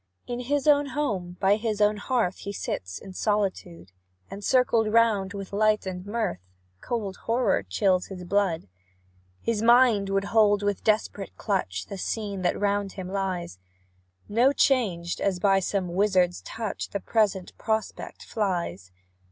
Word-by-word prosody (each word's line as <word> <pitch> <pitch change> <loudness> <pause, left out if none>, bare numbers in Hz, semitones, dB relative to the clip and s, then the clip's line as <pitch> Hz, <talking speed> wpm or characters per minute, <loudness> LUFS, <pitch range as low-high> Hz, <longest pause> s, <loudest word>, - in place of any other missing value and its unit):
In 245 0 -4
his 275 +3 -1
own 290 -1 +5
home, 205 -11 -3
by 195 +2 +4
his 220 -1 -2
own 210 0 +3
hearth, 215 -4 0
He 200 - -5
sits 90 - -4
in 190 - -10
solitude, 185 - -2 0.4
And 200 +1 -7
circled 230 -3 +3
round 210 -4 +3
with 195 -1 -7
light 215 0 +2
and 180 -1 -5
mirth, 215 - -2 0.4
Cold 210 -5 -3
horror 235 - +2
chills 180 - +1
his 185 -2 -8
blood. 180 - 0 0.8
His 225 -2 0
mind 235 -4 +5
would 195 0 +1
hold 205 -2 +4
with 205 -1 -1
desperate 210 -2 -1
clutch 135 - -2
The 200 - -7
scene 200 -1 -3
that 175 - 0
round 200 -1 0
him 185 -2 -6
lies; 185 - -3 0.7
No 240 +6 +4
changed, 200 -12 +1
as 195 -2 +1
by 195 +1 +3
some 190 0 -1
wizard's 185 -2 +2
touch, 225 -3 -5
The 200 - -3
present 200 -3 0
prospect 220 0 -3
flies. 175 - -3
200 Hz, 150 wpm, -26 LUFS, 185-220 Hz, 0.8 s, own